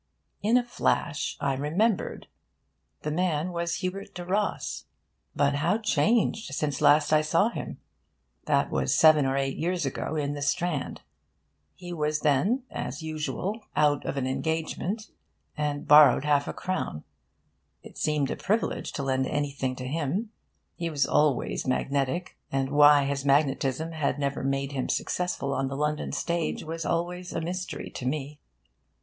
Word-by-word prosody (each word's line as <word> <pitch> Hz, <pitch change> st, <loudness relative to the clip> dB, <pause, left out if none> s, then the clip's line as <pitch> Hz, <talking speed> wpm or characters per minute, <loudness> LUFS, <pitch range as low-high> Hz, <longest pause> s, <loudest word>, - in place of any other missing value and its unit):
In 225 Hz, +4 st, +4 dB
a 250 Hz, -, +2 dB
flash 170 Hz, -9 st, -1 dB
I 140 Hz, -1 st, 0 dB
remembered. 170 Hz, -, 0 dB, 0.8 s
The 150 Hz, -, -2 dB
man 175 Hz, 0 st, 0 dB
was 170 Hz, +2 st, -2 dB
Hubert 190 Hz, +1 st, -5 dB
le 175 Hz, -, -6 dB
Ros. 200 Hz, +3 st, -1 dB, 0.5 s
But 145 Hz, 0 st, +2 dB
how 170 Hz, +8 st, +2 dB
changed 220 Hz, -, +1 dB
since 145 Hz, -3 st, -2 dB
last 150 Hz, +1 st, +5 dB
I 155 Hz, -, +6 dB
saw 165 Hz, +8 st, +2 dB
him! -, -, -6 dB, 0.7 s
That -, -, +2 dB
was -, -, +1 dB
seven 155 Hz, -4 st, +6 dB
or 135 Hz, +1 st, 0 dB
eight 135 Hz, 0 st, -1 dB
years 175 Hz, 0 st, -1 dB
ago, 135 Hz, +3 st, -3 dB
in 145 Hz, -1 st, -1 dB
the 145 Hz, -, -5 dB
Strand. 155 Hz, +1 st, -1 dB, 0.7 s
He 175 Hz, -1 st, -8 dB
was 150 Hz, -2 st, -1 dB
then 180 Hz, -, +2 dB
(as 145 Hz, +5 st, -5 dB
usual) 160 Hz, +7 st, -3 dB
out 145 Hz, -1 st, +3 dB
of 140 Hz, -, -3 dB
an 135 Hz, -, 0 dB
engagement, 160 Hz, -, -2 dB, 0.4 s
and 150 Hz, -1 st, -2 dB
borrowed 150 Hz, -2 st, +7 dB
half 145 Hz, -1 st, +2 dB
a -, -, -3 dB
crown. 185 Hz, -, -3 dB, 0.8 s
It -, -, -13 dB
seemed 150 Hz, -3 st, 0 dB
a -, -, -1 dB
privilege 215 Hz, +3 st, -1 dB
to 140 Hz, -, -3 dB
lend 130 Hz, -1 st, 0 dB
anything 140 Hz, -3 st, -2 dB
to 125 Hz, -, -6 dB
him. 165 Hz, -, -2 dB, 0.4 s
He 170 Hz, -1 st, -3 dB
was 145 Hz, -4 st, +1 dB
always 145 Hz, -3 st, +1 dB
magnetic. 140 Hz, +6 st, -1 dB
And 135 Hz, 0 st, -1 dB
why 145 Hz, -1 st, +7 dB
his 140 Hz, 0 st, -2 dB
magnetism 140 Hz, +2 st, +1 dB
had 155 Hz, -4 st, -1 dB
never 140 Hz, -1 st, -2 dB
made 135 Hz, 0 st, -1 dB
him 135 Hz, -2 st, -3 dB
successful 180 Hz, -6 st, -1 dB
on 135 Hz, -, 0 dB
the 135 Hz, +1 st, -4 dB
London 150 Hz, +1 st, -1 dB
stage 170 Hz, -1 st, -2 dB
was 165 Hz, 0 st, -4 dB
always 180 Hz, +2 st, -2 dB
a -, -, -1 dB
mystery 180 Hz, +3 st, -4 dB
to 125 Hz, -, -5 dB
me. 145 Hz, +1 st, -3 dB
150 Hz, 155 wpm, -27 LUFS, 140-175 Hz, 0.8 s, borrowed